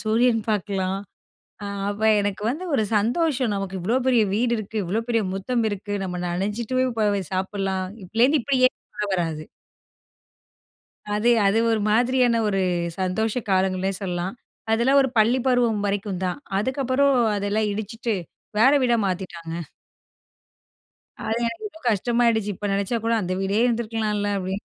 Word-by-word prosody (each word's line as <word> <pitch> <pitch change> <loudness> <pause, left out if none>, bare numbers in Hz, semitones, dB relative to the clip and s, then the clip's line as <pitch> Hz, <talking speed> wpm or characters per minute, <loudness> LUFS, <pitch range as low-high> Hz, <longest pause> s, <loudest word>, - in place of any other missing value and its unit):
சூரியன் 225 +1 +3
பாக்கலாம் 195 -2 -1 0.7
அ - - -4 0.2
அப்போ 210 +2 -1
எனக்கு 205 0 -2
வந்து 310 +9 -2
ஒரு 220 - +3
சந்தோஷம் 250 +1 +1
நமக்கு 195 -1 -4
இவ்வளோ 220 +8 0
பெரிய 245 -4 +4
வீடு 235 +2 +1
இருக்கு. 215 +1 -6
இவ்வளோ 200 +6 -1
பெரிய 230 -2 +2
முற்றம் 225 +5 -1
இருக்கு. 205 0 -5
நம்ம 180 -1 -4
நனைச்சிட்டு 210 +8 -2
போய், 255 -2 +1
போய் 205 -4 0
சாப்பிடலாம் 190 0 -1 0.2
இப்பலேருந்து 245 - +3
இப்டியே 255 -1 +4 0.3
உள்ள 210 - -2
வராது. 165 -4 -2 1.7
அது 220 +3 +3 0.2
அது 205 +3 +3
ஒரு 220 -2 +1
மாதிரியான 245 0 +3
ஒரு 195 -1 0 0.4
சந்தோஷ 205 +4 0 0.2
காலங்கள்னே 190 0 +1
சொல்லலாம். 180 +2 -3 0.4
அதெல்லாம் 260 +5 +4
ஒரு 265 - 0
பள்ளி 235 +4 +4
பருவம் 240 -5 +2
வரைக்கும் 200 -2 -2
தான், 180 +9 -2 0.2
அதுக்கப்புறம் 260 +4 +1 0.2
அதெல்லாம் 205 +1 0
இடிச்சுட்டு 220 +2 -3 0.4
வேற 260 +6 +6
வீடா 240 -2 +3
மாத்திட்டாங்க. 175 -3 -4 1.7
அது 225 +1 0
எனக்கு 230 - -5
இவ்ளோ 320 -4 -16
கஷ்டமாயிடுச்சு. 230 0 +1
இப்போ 205 - -5
நினைச்சா 200 +4 0
கூட 230 - +2
அந்த 180 +1 -2
வீடே 195 +2 0
இருந்துருக்கலாம்ல 220 -3 -1
அப்படின்னு. 190 +2 -4
215 Hz, 140 wpm, -24 LUFS, 195-240 Hz, 1.7 s, வேற